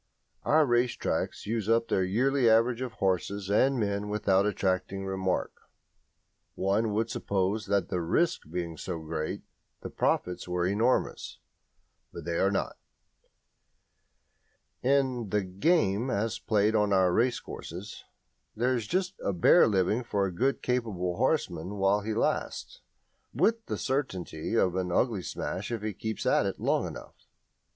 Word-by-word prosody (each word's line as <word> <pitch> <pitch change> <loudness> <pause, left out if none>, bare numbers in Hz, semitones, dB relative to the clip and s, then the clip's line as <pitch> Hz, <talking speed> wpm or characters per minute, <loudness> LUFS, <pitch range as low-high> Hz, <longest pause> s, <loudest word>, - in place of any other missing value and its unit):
Our 155 0 +4
race 120 -1 +2
tracks - - -3
use 110 -1 -2
up 115 0 +3
their 95 - +1
yearly 125 +6 +2
average 115 +2 +3
of 125 -3 -4
horses 95 0 -1
and 130 +5 +3
men 100 -1 -1
without 100 -1 +2
attracting 95 -1 -1
remark. 95 -1 -1 1.0
One 105 +3 +1
would 110 +2 0
suppose 100 +2 -1
that 100 0 +1
the 90 -2 -1
risk 160 - 0
being 85 -1 -4
so 90 0 -4
great 80 0 -4 0.4
the - - -7
profits 90 0 -1
were 90 0 0
enormous; 110 +7 0 0.7
but - - -9
they 85 -1 -1
are 95 - +3
not. 100 - -2 2.0
In 130 -4 +1
"the 105 +1 +1
game" 100 - +1
as 110 -1 -1
played 105 0 +2
on 105 -2 +2
our 95 -2 +4
racecourses 105 -5 -3 0.5
there 125 +3 +1
is 115 -4 -2
just 185 - 0
a - - +1
bare 90 - +5
living 105 +3 +1
for 100 -4 0
a 95 - -2
good 135 +9 0
capable 105 -8 -1
horseman 100 - 0
while 100 +1 +2
he 110 +1 -3
lasts, - - -2 0.5
with 225 0 +1
the - - -2
certainty 110 - -2
of 90 -5 +2
an 90 -1 -1
ugly 110 +1 +1
smash 95 +4 -4
if 115 -3 -3
he 110 -1 -2
keeps 110 +3 -4
at - - +3
it - - -4
long - - +1
enough. - - -11
105 Hz, 145 wpm, -29 LUFS, 95-120 Hz, 2.0 s, bare